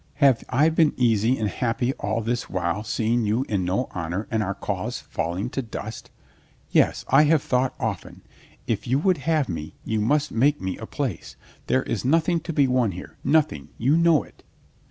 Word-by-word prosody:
"Have 140 -4 +4
I 145 +5 +4
been 160 -1 +2
easy 120 0 +2
and 110 - -1
happy 120 +5 -1
all 115 +1 -1
this 120 +2 -2
while 90 +2 -1
seeing 115 +1 0
you 110 +5 0
in 100 -3 0
no 95 +8 0
honor 90 +4 -4
and 110 -1 +1
our 100 -1 -2
cause - - -3
falling 85 +8 -3
to 135 - -2
dust? 110 -2 -7 0.6
Yes, - - +2
I 145 +3 +6
have 155 -1 +3
thought 125 0 0
often. 110 -8 -4 0.4
If 115 +1 -2
you 130 +3 +2
would 180 +4 +2
have 155 -4 +2
me, 80 -4 -6
you 110 -1 0
must 145 +7 +1
make 140 +6 +2
me 95 -1 -3
a 110 - -7
place. 130 - -4 0.3
There 130 - +2
is 110 - -3
nothing 165 +5 +2
to 165 +2 -5
be 145 -3 +3
won 125 -6 +1
here, 90 - -10
nothing, 150 - +1
you 135 +6 +2
know 165 -3 +4
it." - - -20
120 Hz, 190 wpm, -24 LUFS, 105-140 Hz, 0.6 s, I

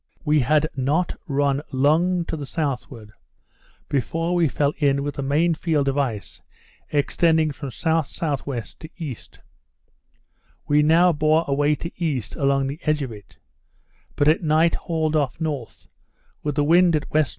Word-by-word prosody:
We 150 0 +3
had 150 +4 +3
not 145 +7 0
run 140 -1 +1
long 165 +6 +2
to - - -4
the 145 -3 -6
southward 130 -8 -4 0.8
before 165 +6 -1
we 175 -2 +3
fell 145 +1 0
in 140 -2 +2
with 145 0 -3
the - - -5
main 150 +5 +2
field 155 -3 0
of 135 - +1
ice 115 -7 -3 0.5
extending 160 +2 +2
from 140 0 -7
S.S.W. 145 -3 -2 0.2
to 160 - -10
E. 155 -8 -4 1.5
We 150 0 +4
now 165 +4 +5
bore 155 +2 +2
away 145 +2 +2
to 170 +4 -6
east 135 -10 -2
along 140 -1 +1
the 140 +4 -5
edge 155 -2 0
of 130 - -5
it; 105 -3 -13 0.8
but 145 - +2
at 155 - +4
night 160 +1 +3
hauled 160 -2 -1
off 140 -4 0
north, 145 - -5 0.5
with 150 -1 -3
the 145 - +2
wind 170 +2 +4
at 150 - 0
W.N. 155 0 +3
150 Hz, 155 wpm, -23 LUFS, 140-160 Hz, 1.5 s, now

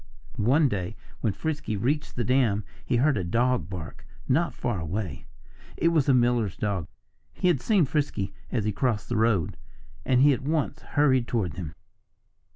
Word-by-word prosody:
One 135 +8 +4
day 100 -3 -3 0.2
when 110 - +1
Frisky 145 -8 -3
reached 145 +9 -1
the 120 - -1
dam 120 -5 +2 0.2
he - - 0
heard 135 -1 +3
a - - -2
dog 120 +4 +1
bark 90 -4 -7 0.2
not 165 +6 +2
far 120 -7 -2
away. 80 -3 -4 0.5
It 165 - +3
was 155 -4 +2
the 140 - +5
miller's 120 -5 +2
dog. 100 -6 -2 0.5
He 180 - +1
had 145 -7 +2
seen 200 -8 +3
Frisky 135 -9 -1 0.2
as 115 -5 0
he 105 - +1
crossed 115 0 -1
the 120 - -1
road. 110 -6 +1 0.5
And 125 -1 +3
he 145 +1 +6
at 125 - -3
once 155 +1 -1
hurried 130 -5 +2
toward 100 - -1
him. 85 -3 -6
120 Hz, 170 wpm, -26 LUFS, 100-140 Hz, 0.5 s, he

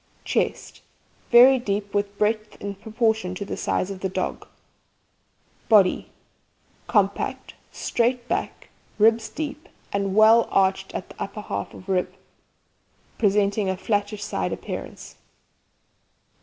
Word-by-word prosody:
CHEST - - -2 0.5
Very 255 +2 +8
deep, 200 -3 -3
with 205 0 -1
breadth 215 0 -1
in 200 0 -5
proportion 220 -2 -1
to 200 - -5
the - - -4
size 190 - -1
of 195 - -7
the 190 - -2
dog. - - -3 1.2
BODY 205 -5 +4 0.8
Compact, 200 -2 0 0.2
straight 240 +1 -1
back, - - -3 0.3
ribs 225 +1 +3
deep 305 0 -6 0.2
and 200 -1 -1
well 220 +2 +6
arched 190 0 +1
in - - -2
the - - -13
upper 210 +2 -5
half 100 - -5
of 185 - -13
rib, 185 -2 0 1.1
presenting 205 -1 +2
a 190 - -1
flattish 205 +1 -1
side - - -2
appearance. - - -7
205 Hz, 120 wpm, -24 LUFS, 195-225 Hz, 1.2 s, Very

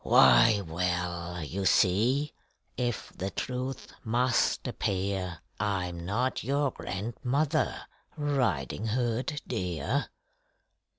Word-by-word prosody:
Why, 65 - +6
well: 85 0 -2
you 95 +7 -3
see 115 +12 +3 0.4
if 120 -3 -2
the 95 - -3
truth 130 +5 -4
must 120 +2 +2
appear 95 -2 -2 0.2
I'm 90 -4 -2
not 125 +6 0
your 140 +3 +1
grandmother, 125 - -1 0.4
Riding 115 - 0
Hood, 125 +5 -1
dear! 90 - -1
105 Hz, 85 wpm, -29 LUFS, 90-130 Hz, 0.4 s, Why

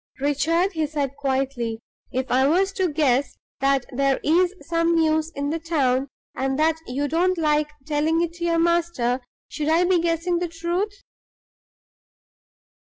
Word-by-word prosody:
"Richard," 320 +7 +1
he 320 -4 -1
said, 285 -3 -3
quietly, 265 -5 -2 0.3
"if 260 +1 -2
I 265 +2 +4
was 380 +6 +2
to 375 -4 0
guess 285 -2 +1 0.2
that 275 -1 +2
there 275 0 +2
is 355 +4 +3
some 335 0 +1
news 315 -1 +2
in 285 +1 -2
the 330 - -2
town, 275 -5 +1 0.3
and 265 0 -1
that 320 +1 +2
you 280 +4 -1
don't 350 +5 +1
like 300 -2 +1 0.2
telling 310 +2 +1
it 335 -1 -3
to 345 0 -4
your 335 -1 +2
master, 330 -7 +1 0.3
should 300 -1 -3
I 330 +3 +4
be 360 0 +3
guessing 340 +1 0
the 350 - -1
truth?" 345 +5 -3
315 Hz, 155 wpm, -23 LUFS, 275-340 Hz, 0.3 s, I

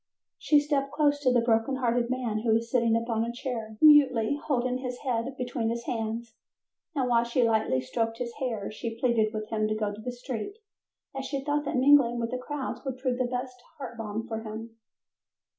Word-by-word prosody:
She 295 - +4
stepped 285 -2 -1
close 290 -1 +2
to 265 -3 +2
the 245 -1 +4
broken 230 +2 +2
hearted 240 -2 0
man, 245 -4 -1
who 225 0 +1
was 230 +1 -1
sitting 235 -3 +3
upon 230 -1 -1
a 235 - -2
chair, 230 -3 -5
mutely 285 -5 +6
holding 255 -4 -1
his 250 -1 -4
head 255 0 -2
between 245 -2 -2
his 235 0 -3
hands, 225 0 -3 0.6
and 260 -3 +1
while 235 -1 +3
she 235 +1 +1
lightly 220 - +2
stroked 225 - -2
his 235 -1 -4
hair 225 -7 -3
she 225 +1 -6
pleaded 235 -4 +2
with 215 -1 -5
him 215 -1 0
to 215 - -1
go 210 -1 -1
to 210 - -9
the 250 - -4
street, 245 - -5 0.6
as 270 0 -4
she 275 -1 -3
thought 295 0 0
that - - -2
mingling 260 -3 +5
with 230 0 -2
the 250 - -2
crowds 280 +1 -4
would 265 -2 -4
prove 255 -1 -1
the 255 - +2
best 250 0 -4 0.2
heart 265 -4 -7
balm 225 -1 -4
for 225 -1 -3
him. 225 +1 -7
240 Hz, 205 wpm, -28 LUFS, 225-260 Hz, 0.6 s, mutely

